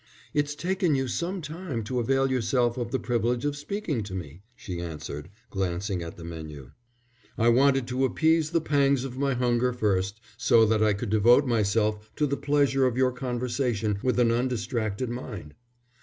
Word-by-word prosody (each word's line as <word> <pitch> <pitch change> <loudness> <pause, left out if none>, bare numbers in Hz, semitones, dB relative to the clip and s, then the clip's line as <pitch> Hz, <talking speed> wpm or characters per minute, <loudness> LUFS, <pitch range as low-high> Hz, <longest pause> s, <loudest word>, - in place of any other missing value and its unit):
"It's 145 0 0
taken 180 0 0
you 135 -1 0
some 175 +7 -3
time 155 -6 -5
to 125 +4 -2
avail 135 +3 +1
yourself 120 -1 +1
of 120 -2 -3
the 130 - 0
privilege 120 +2 -1
of 145 0 0
speaking 150 - -3
to 95 -2 -6
me," 85 -1 -7
she 90 -9 -6
answered, 75 -1 -6 0.2
glancing 95 -1 -2
at 85 -1 -7
the 85 - -9
menu. 80 -5 -8 0.7
"I 115 +1 +4
wanted 135 +1 +4
to 130 +1 0
appease 160 +4 +2
the 165 0 +1
pangs 140 -3 +2
of 130 -1 -6
my 140 -2 +1
hunger 125 0 +1
first, 100 -3 0 0.2
so 115 -1 +5
that 110 0 +2
I 105 -1 +4
could 100 +1 -4
devote 120 +6 +5
myself 105 -2 +1
to 150 - +1
the 140 -1 0
pleasure 140 -2 +2
of 125 -1 -2
your 130 -1 +3
conversation 120 -4 -1
with 125 -1 0
an 120 -1 +4
undistracted 120 -2 -1
mind." 105 - -7
120 Hz, 175 wpm, -27 LUFS, 105-135 Hz, 0.7 s, so